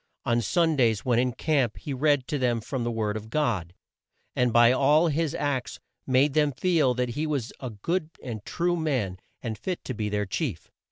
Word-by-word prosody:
On 120 0 +2
Sundays, 130 - +2
when 120 -2 +3
in 125 0 +2
camp, 135 -6 0
he 145 - -5
read 145 -1 +2
to 145 - -2
them 120 -2 +1
from 130 +2 -4
the 120 - -1
word 110 -2 -1
of 110 0 -6
God, 105 - -1 0.6
and 125 -1 +2
by 120 +1 +6
all 150 +6 +4
his 160 +1 0
acts 140 -4 -2 0.3
made 135 +2 +3
them 150 -2 +2
feel 155 -6 +2
that 125 0 -1
he 150 +6 -2
was 140 -6 -2
a 130 - -5
good 155 - -2
and 110 -5 -6
true 175 +7 0
man, 130 - -1 0.2
and 110 -3 -4
fit 180 +7 -4
to 130 - -3
be 105 -2 -2
their 105 0 -1
chief. 105 - -4
130 Hz, 200 wpm, -26 LUFS, 115-150 Hz, 0.6 s, by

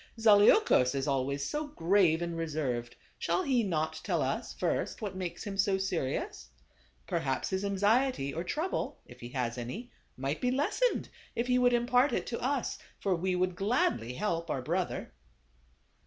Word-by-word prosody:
Zaleukos 205 - +5
is 135 0 -1
always 140 +1 0
so 300 0 -2
grave 175 - +3
and 170 -1 -3
reserved; 145 -8 -2 0.2
shall 370 - +1
he 260 -6 +2
not 160 -5 -1
tell - - 0
us, - - -2
first, - - -1
what 205 -4 -4
makes 185 -2 -4
him 195 -2 -5
so 195 -1 +3
serious? 150 - -2 0.6
Perhaps 135 - -1
his 190 +1 -1
anxiety 200 - +2
or 165 - -3
trouble, 315 - -2
if - - -14
he 120 - -8
has 125 -2 -2
any, 200 - -6 0.3
might 135 +4 -2
be 250 - +2
lessened 295 - +1 0.3
if 235 - 0
he 250 0 +3
would 245 0 +4
impart 245 +3 +3
it - - 0
to 235 - -4
us; 265 0 -1 0.2
for 195 -2 +1
we 180 +2 0
would 180 0 0
gladly 180 - +1
help 170 -4 -1
our 130 -4 -2
brother." - - -2
185 Hz, 165 wpm, -31 LUFS, -, 0.6 s, Zaleukos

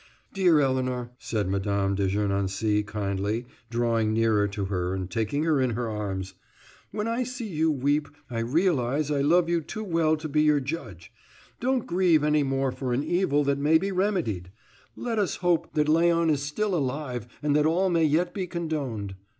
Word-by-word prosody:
"Dear 180 -5 +4
Elinor," 130 -2 -1
said 105 -4 -2
Mme. 100 0 0
de 100 0 0
Gernancé 100 +1 0
kindly, 100 +2 -2 0.2
drawing 115 -2 +1
nearer 110 -2 +2
to 100 0 -3
her 90 -1 -2
and 95 -1 -3
taking 115 +8 -1
her 155 -4 +2
in 130 - +2
her 120 0 -2
arms, 95 -3 -4 0.6
"when 210 +1 -3
I 230 +2 0
see 250 -1 -4
you 160 -4 +1
weep, 145 +1 +1 0.2
I 120 -2 -4
realize 145 +1 +1
I 140 -1 +1
love 165 +4 +4
you 170 -1 +1
too 215 +8 -6
well 165 -5 +1
to 155 +1 -5
be 150 0 +1
your 150 -1 +4
judge. 130 - -6 0.5
Don't 255 0 0
grieve 175 -4 +3
any 150 0 +3
more 135 -1 0
for 125 -1 -3
an 130 +4 0
evil 160 -5 +1
that 140 0 0
may 150 +3 +4
be 195 +4 -2
remedied. 180 - -1 0.5
Let 230 -3 -2
us 200 - 0
hope 175 -2 0
that 150 -1 +3
Léon 165 +1 +3
is 145 -2 0
still 190 +8 -2
alive, 130 - -2 0.2
and 145 -1 +2
that 150 +1 +4
all 180 +3 +2
may 165 -2 +3
yet 170 +4 +1
be 185 -2 -3
condoned." 145 - -3
145 Hz, 185 wpm, -26 LUFS, 110-165 Hz, 0.6 s, Dear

